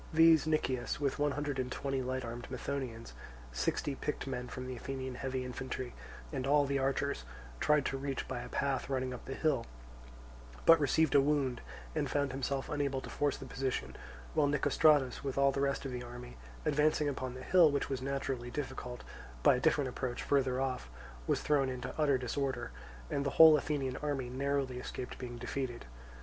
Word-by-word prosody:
These 160 -1 +6
Nicias, 135 -5 0
with 140 0 -1
one 145 -1 +2
hundred 145 -2 -2
and 125 0 -2
twenty 135 0 -1
light 130 0 -2
armed 120 +1 -6
Methonaeans, 125 - -4 0.4
sixty 65 - -1
picked 150 +2 -3
men 125 -2 -4
from 130 0 -6
the 130 0 -5
Athenian 130 +1 -5
heavy 130 0 -3
infantry, 125 0 -5 0.4
and 130 - -2
all 145 0 +5
the 140 0 0
archers, 135 - 0 0.4
tried 150 -2 +3
to 135 - -1
reach 135 -1 -3
by - - -3
a - - -8
path 140 -1 -1
running 130 -1 -1
up 125 - -9
the 135 - -5
hill, 140 -7 +1 1.0
but 165 -1 +8
received 150 +2 +3
a 140 - +7
wound 135 -4 +1 0.3
and 150 -3 -1
found 140 -1 +1
himself 135 +1 -2
unable 140 -2 -1
to - - -8
force 145 -2 0
the - - -8
position; 135 -1 -3 0.4
while 150 -2 +3
Nicostratus, 145 -1 +3
with 135 -1 -3
all 140 0 +5
the 140 - -2
rest 140 0 0
of 135 - -3
the 125 -1 -4
army, 120 0 -9 0.3
advancing 150 0 +3
upon 130 -3 -3
the 130 - -8
hill, 175 +2 +6
which 140 -1 0
was 135 -2 -3
naturally 135 -2 -2
difficult, 130 -2 -5 0.4
by - - +6
a - - -4
different 140 +1 +3
approach 125 -1 -3
further 130 -2 +2
off, 130 - -2 0.4
was - - +1
thrown 140 -3 +3
into 125 -1 -4
utter 145 -3 +4
disorder; 130 - -2 0.4
and 140 - 0
the 140 - 0
whole 160 -1 +10
Athenian 140 -3 -1
army 140 -4 -2
narrowly 135 -1 -1
escaped 125 0 -6
being 120 -1 -6
defeated. 125 0 -4
135 Hz, 185 wpm, -33 LUFS, 125-145 Hz, 1.0 s, whole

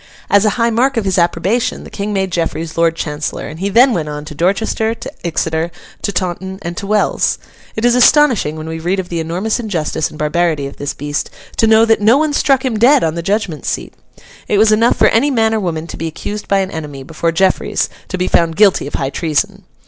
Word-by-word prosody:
As 200 +1 +5
a - - +4
high 230 0 +2
mark 255 +3 +1
of 220 - 0
his 190 -1 +1
approbation, 175 +7 0
the - - -12
King 205 +1 -4
made 190 -2 -1
Jeffreys 165 -1 -2
Lord 165 -1 +2
Chancellor; 150 -2 -4
and 155 +2 -9
he 195 +2 -1
then 245 +5 +5
went 155 -6 -2
on 150 0 -6
to 150 - -8
Dorchester, 215 +7 0
to - - -8
Exeter, 160 -1 -1 0.3
to 200 - -1
Taunton, 190 0 -3
and 170 0 -4
to 200 - -5
Wells. 210 0 +1 0.4
It 220 - -1
is 245 - +4
astonishing, 250 - +4
when 155 0 -7
we 160 0 -5
read 180 +4 -1
of 180 -1 -5
the 170 - -2
enormous 180 +8 -2
injustice 165 -8 -2
and 155 - -12
barbarity 155 -1 0
of 140 - -8
this 145 0 -4
beast, 145 +1 -3 0.3
to 225 - +3
know 220 +1 +6
that 225 -2 +2
no 225 +5 +5
one 305 0 +1
struck 275 -2 +2
him 230 -4 -1
dead 265 +4 +5
on 160 - +1
the 170 - -3
judgment 190 - -2
seat. - - -3 0.5
It 205 - +1
was 215 +1 +5
enough 230 +3 +3
for - - +4
any 255 +6 +2
man 225 -4 +2
or 220 - +1
woman 165 -5 -3
to 170 - -8
be 165 - -3
accused 205 +6 -6
by 195 -1 +2
an 190 0 -3
enemy, 145 -4 -6
before 165 +3 -2
Jeffreys, 190 +3 +1 0.2
to 185 - -4
be 180 0 -1
found 165 -1 +2
guilty 200 -7 +3
of - - -6
high 135 0 -2
treason. 190 +6 -1
190 Hz, 230 wpm, -16 LUFS, 160-220 Hz, 0.5 s, know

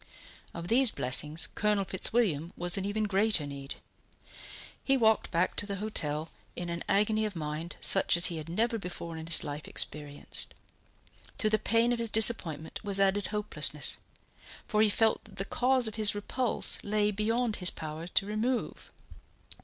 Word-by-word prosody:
Of 170 0 -6
these 250 +5 +5
blessings 150 - +1
Colonel 210 -2 0
Fitzwilliam 190 -4 +1
was 175 0 0
in 195 - -1
even 210 +2 -1
greater 200 -4 +2
need. 140 -1 -7 1.1
He 270 0 +2
walked 220 -3 +3
back 170 +1 0
to 205 - +1
the 200 - -3
hotel 160 -7 -3 0.2
in 175 -1 -4
an 170 0 -4
agony 215 +2 +2
of 210 -3 -3
mind 155 +1 -5
such - - +3
as 175 - +5
he 170 -2 +2
had 155 +1 -7
never 230 +6 0
before 175 -3 -7
in 160 0 -7
his 165 - +5
life 145 +1 -6
experienced. 145 -1 -3 0.8
To 215 -2 +3
the 215 - +3
pain 230 +1 +2
of 240 - -3
his 230 -1 0
disappointment 195 -9 +1
was 200 -2 0
added 195 0 +2
hopelessness, 210 -1 -2 0.7
for 215 -1 +1
he 215 - +5
felt 220 +2 +2
that 205 -3 -15
the 195 0 -2
cause 255 +2 +2
of 220 - -4
his 205 -1 +5
repulse 235 +4 -1
lay 210 0 0
beyond 220 +2 0
his 180 -2 0
power 155 +1 -7
to 190 - 0
remove. 225 +4 -3
200 Hz, 170 wpm, -30 LUFS, 170-220 Hz, 1.1 s, these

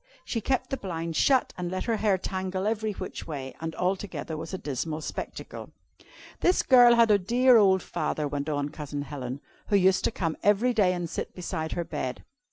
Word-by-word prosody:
She 230 - -2
kept 260 +4 -1
the 270 - -1
blinds 165 -5 -4
shut, 260 - +3
and 175 -1 -2
let 185 +1 -3
her 230 -2 0
hair 205 -3 +2
tangle 185 +1 -3
every 215 0 -1
which - - -7
way, 135 -4 -6
and 160 0 -4
altogether 185 -3 -2
was 160 +1 -6
a 190 - -3
dismal 155 +1 -4
spectacle. - - -7 0.7
"This 360 - +3
girl 245 -2 +7
had 230 -2 +5
a 205 - +5
dear 245 +6 +5
old 190 -3 +4
father," 150 -1 -2
went 145 +1 -3
on 145 -1 -1
Cousin 145 -2 -5
Helen, 135 -2 -6 0.3
"who 205 - +2
used 190 -1 +4
to - - +1
come 165 -7 -2
every 210 +5 +3
day 195 -5 +3
and 175 -1 -3
sit 165 - -5
beside 160 -3 -4
her 175 - -1
bed. 145 -6 -4
185 Hz, 195 wpm, -27 LUFS, 155-215 Hz, 0.7 s, girl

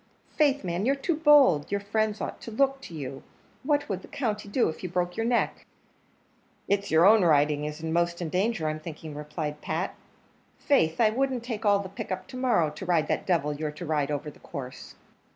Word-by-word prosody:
Faith, 285 -4 +3
man, 175 +1 -2
you're 270 +5 +2
too 310 +4 -1
bold; 290 - +5
your 200 - +1
friends 215 +1 -1
ought - - -5
to - - -7
look 270 +4 +1
to 170 - -9
you; 135 -3 -6 0.4
what 290 +1 +1
would 190 -3 -3
the - - -13
country 210 -6 -3
do 240 +4 +2
if 160 - -5
you 185 - -4
broke 180 0 -1
your 225 - -1
neck?" 240 -1 0 1.0
"It's 200 0 0
your 160 +2 +5
own 215 +2 +7
is 150 -1 +2
in 160 0 -2
most 170 0 +1
danger, 190 -3 0
I'm 155 0 -2
thinking," 155 -1 -8
replied 150 0 -5
Pat; 165 +4 -2 0.6
"faith, 165 - +2
I 220 -2 +5
wouldn't 260 0 -1
take 225 -3 -3
all 205 0 +5
the 200 -1 -4
pick 190 0 -7
up 185 0 -3
to 260 - -9
morrow, 235 -12 +2
to 150 - -9
ride 175 -4 +1
that - - -1
devil 155 -5 +1
you're 150 +1 -3
to 150 +4 -8
ride 150 -3 0
over 150 +1 -3
the - - -20
course." 130 -5 -8
185 Hz, 205 wpm, -27 LUFS, 155-230 Hz, 1.0 s, own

